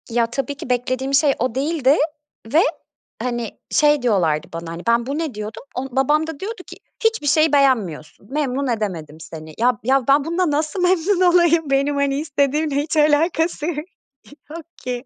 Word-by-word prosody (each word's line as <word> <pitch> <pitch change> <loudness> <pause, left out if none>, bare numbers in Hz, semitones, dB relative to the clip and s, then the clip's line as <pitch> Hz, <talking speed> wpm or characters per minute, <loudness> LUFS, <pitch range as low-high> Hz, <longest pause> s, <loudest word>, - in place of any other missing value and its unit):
Ya, 235 0 +2
tabii 270 +5 -4
ki 255 - -8
beklediğim 255 +2 -1
şey 280 0 +4
o 250 -1 -1
değildi 285 0 +2 0.6
ve, 320 - +6 0.6
hani, 240 -3 -2 0.2
şey 295 -2 +4
diyorlardı 170 -10 +1
bana: 165 0 -6
Hani, 170 +1 -7
ben 235 0 +3
"Bu 275 +3 -3
ne?" 320 -5 -3
diyordum, 215 +1 -7
o 255 +2 -3
babam 295 +4 +2
da 320 -3 -7
diyordu 405 0 -6
ki - - -11 0.3
"Hiçbir 450 -9 +1
şeyi 310 +1 +3
beğenmiyorsun, 200 - +1
memnun 280 -2 -1
edemedim 180 -10 -3
seni." 155 0 -10
Ya 245 0 +2
ya, 265 +1 +2
ben 280 +1 +4
bununla 340 0 0
nasıl 305 +5 -1
memnun 360 +1 +2
olayım? 335 -3 +3
Benim 275 +1 +1
hani 280 0 0
istediğimle 290 0 0
hiç 300 +3 -1
alakası 310 +1 +2
y 345 - -1 0.8
yok 325 +1 -8 0.2
ki. 250 0 -4
275 Hz, 170 wpm, -20 LUFS, 240-310 Hz, 0.8 s, ve